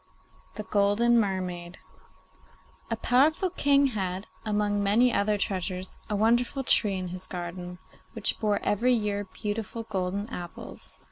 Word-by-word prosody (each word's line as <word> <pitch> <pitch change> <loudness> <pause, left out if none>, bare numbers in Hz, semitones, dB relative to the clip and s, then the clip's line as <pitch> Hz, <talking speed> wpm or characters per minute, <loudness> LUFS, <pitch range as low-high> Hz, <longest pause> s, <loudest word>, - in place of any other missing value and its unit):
THE 215 - -5
GOLDEN 210 +4 +3
MERMAID 185 -3 -2 1.1
A 230 - 0
powerful 295 - +3
king 285 -4 +4
had, 190 -1 -2 0.2
among 210 -1 0
many 225 +5 +4
other 205 +1 +2
treasures, 185 -1 -3
a 210 - 0
wonderful 240 +5 +2
tree 205 -6 +3
in 185 -1 -4
his 180 +1 -3
garden, 180 0 -6 0.4
which 225 -3 +1
bore 210 -2 +1
every 240 +5 +2
year 205 -3 0
beautiful 215 +3 -4
golden 195 0 -2
apples. 175 -1 -7
205 Hz, 130 wpm, -27 LUFS, 185-230 Hz, 1.1 s, king